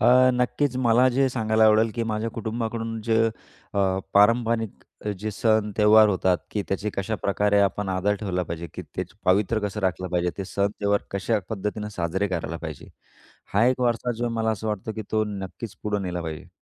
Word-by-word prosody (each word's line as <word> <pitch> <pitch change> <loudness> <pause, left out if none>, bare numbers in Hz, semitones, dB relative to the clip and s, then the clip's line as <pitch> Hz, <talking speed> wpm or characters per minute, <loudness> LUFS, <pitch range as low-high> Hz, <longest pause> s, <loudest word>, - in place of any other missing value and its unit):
अ, 130 +2 +6
नक्कीच 125 +2 0
मला 125 0 +4
जे 135 +1 +2
सांगायला 110 -3 +2
आवडेल, 110 +1 +5
की 115 - -1
माझ्या 110 0 -2
कुटुंबाकडून 115 0 -3
जे 110 0 +1 0.6
अ, - - 0 0.4
पारंपरिक 115 +1 +3 0.3
जे 110 +3 -3
सण, 110 0 +1
त्यौहार 105 0 +7
होतात, 95 -2 +2
की 105 - -1
त्याचे 100 +2 -1
कशाप्रकारे 100 0 +1
आपण 100 0 0
आदर 95 +2 +1
ठेवला 90 -3 -1
पाहिजे, 85 0 -5
की - - -5
त्याचं - - -7
पावित्र्य 105 +4 +2
कसं 105 +1 -5
राखलं 95 -1 -1
पाहिजे? 90 0 0
ते 95 - -2
सण, 100 +1 0
त्यौहार 100 0 +2
कशा 100 +3 0
पद्धतीनं 105 0 -3
साजरे 95 +4 -1
करायला 85 -3 -3
पाहिजे? 80 -4 -7 0.7
हा 105 +3 +5
एक 130 0 +2
वारसा 120 0 +1
जो 120 0 0
मला 115 -1 0
असं 110 0 -3
वाटतं 105 +1 -3
की 110 - -5
तो 110 0 +2
नक्कीच 100 +1 -6
पुढे 105 -1 -1
नेला 90 -1 -3
पाहिजे. 80 -2 -6
105 Hz, 180 wpm, -25 LUFS, 95-115 Hz, 0.7 s, त्यौहार